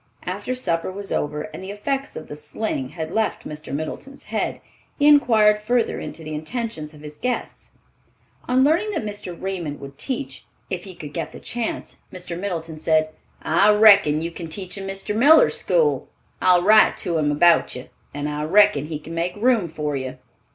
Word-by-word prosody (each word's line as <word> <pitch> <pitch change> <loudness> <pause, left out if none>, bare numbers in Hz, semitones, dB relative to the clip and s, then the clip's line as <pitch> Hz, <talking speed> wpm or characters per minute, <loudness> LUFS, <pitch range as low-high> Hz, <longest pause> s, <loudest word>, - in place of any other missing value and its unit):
After 205 +7 -3
supper 170 -8 -1
was 195 +1 -6
over 150 +1 -1
and 170 - -8
the 190 - -7
effects 270 +7 -3
of 155 - -7
the - - -7
sling 150 -2 -4
had 160 +1 -6
left 220 0 -1
Mr. 150 0 -8
Middleton's 155 - -6
head, - - -2 0.4
he 290 - +3
inquired 220 -8 +5
further 235 +2 0
into 165 - -8
the 155 0 -6
intentions 155 -1 -5
of 150 - -14
his 150 0 -10
guests. 250 0 -4 0.7
On 255 +1 +3
learning 335 +9 +2
that - - -2
Mr. 205 -5 -6
Raymond 175 -6 -4
would 140 0 -11
teach, 260 - -5 0.3
if - - -3
he 190 -2 -10
could 150 -4 -9
get 165 -2 -4
the - - -9
chance, 240 -2 -4
Mr. 180 -1 -6
Middleton 165 -4 -4
said, 155 0 +2 0.3
"I 210 +2 +4
reckon 200 -8 +6
you 170 - -3
can 170 0 -7
teach 180 +3 -4
in 195 -1 -6
Mr. 195 +2 -3
Miller's 290 +8 +6
school. 480 -3 +1 0.3
I'll 180 -1 +5
write 215 +2 +6
to 170 -2 -1
him 145 -1 +1
about 170 +3 +4
you, 125 - -9 0.2
and 145 +1 -4
I 150 0 -3
reckon 175 -5 +4
he 155 -1 -4
can 155 +2 -10
make 170 +2 -2
room 225 -3 +2
for 150 -2 -3
you." 130 -1 -5
180 Hz, 185 wpm, -22 LUFS, 155-215 Hz, 0.7 s, reckon